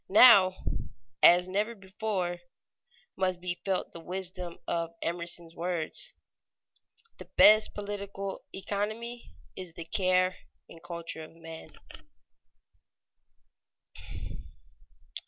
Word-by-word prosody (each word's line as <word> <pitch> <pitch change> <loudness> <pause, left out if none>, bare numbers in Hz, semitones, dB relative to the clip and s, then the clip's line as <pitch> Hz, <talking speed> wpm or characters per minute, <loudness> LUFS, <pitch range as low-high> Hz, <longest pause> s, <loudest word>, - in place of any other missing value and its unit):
Now, 195 -3 +8 0.7
as 175 +1 +7
never 210 +5 -1
before, 190 -3 -3 0.8
must 185 -1 0
be 175 0 -4
felt 190 -2 -1
the 170 - -9
wisdom 180 0 -5
of 170 0 -2
Emerson's 170 -1 -3
words: 175 - 0 1.0
"The - - -8
best 215 +1 +7
political 200 -1 -5
economy 215 +5 -4 0.3
is 185 -3 -8
the 170 0 -8
care 185 +1 +2 0.3
and 165 - -14
culture 170 -1 -6
of 155 - -13
men." 165 -1 -10
185 Hz, 90 wpm, -30 LUFS, 170-200 Hz, 1.0 s, Now